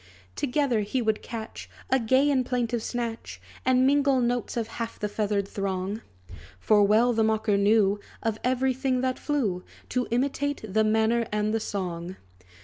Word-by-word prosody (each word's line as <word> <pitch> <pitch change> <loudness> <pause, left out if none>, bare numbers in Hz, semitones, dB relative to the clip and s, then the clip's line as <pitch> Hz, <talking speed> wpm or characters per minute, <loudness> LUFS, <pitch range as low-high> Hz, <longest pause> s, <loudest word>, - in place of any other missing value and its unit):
Together 270 -3 +1
he 210 +5 -1
would 220 -3 0
catch 225 -2 -7 0.2
A 265 - +4
gay 260 +5 +3
and 260 -2 +2
plaintive 240 -2 -1
snatch, 225 - -4 0.2
And 255 0 +3
mingle 280 -1 +3
notes 245 -1 -1
of 230 -2 -1
half 230 0 -5
the 210 - -2
feathered 205 -1 -1
throng. 195 +2 -3 0.6
For 210 - +4
well 220 +4 +4
the 225 -1 +2
mocker 220 -1 +1
knew, 205 0 +3 0.2
Of 220 -1 -1
every 260 +1 +1
thing 260 -1 0
that 255 0 -1
flew, 220 -12 -1 0.3
To 250 -1 -1
imitate 280 +2 -1
the 220 +2 +2
manner 220 +2 +2
and 210 0 0
the 225 - +1
song. 180 -4 -4
225 Hz, 160 wpm, -26 LUFS, 210-255 Hz, 0.6 s, A